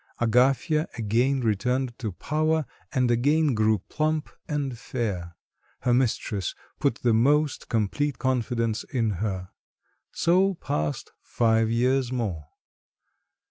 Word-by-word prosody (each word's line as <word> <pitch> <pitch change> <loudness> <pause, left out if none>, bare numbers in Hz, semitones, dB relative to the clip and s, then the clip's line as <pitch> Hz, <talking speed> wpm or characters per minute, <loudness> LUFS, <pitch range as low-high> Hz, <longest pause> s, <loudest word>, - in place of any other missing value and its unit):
Agafya 130 +7 +2
again 120 +5 +1
returned 125 +4 0
to 110 -5 -3
power, 155 - 0 0.3
and 125 -2 +2
again 145 +5 +3
grew 110 -1 +3
plump 155 -1 -1 0.2
and 145 -4 -2
fair; 100 -8 -4 0.5
her 125 - +2
mistress 110 -6 0 0.2
put 140 -5 +2
the 120 -2 +4
most 145 +5 +2
complete 125 +6 0
confidence 120 -3 0
in 115 -4 -1
her. 95 -4 -3 0.6
So 185 +3 +2
passed 75 - -3
five 115 -1 +2
years 125 +2 +1
more. 100 - -3
125 Hz, 110 wpm, -26 LUFS, 110-140 Hz, 0.6 s, the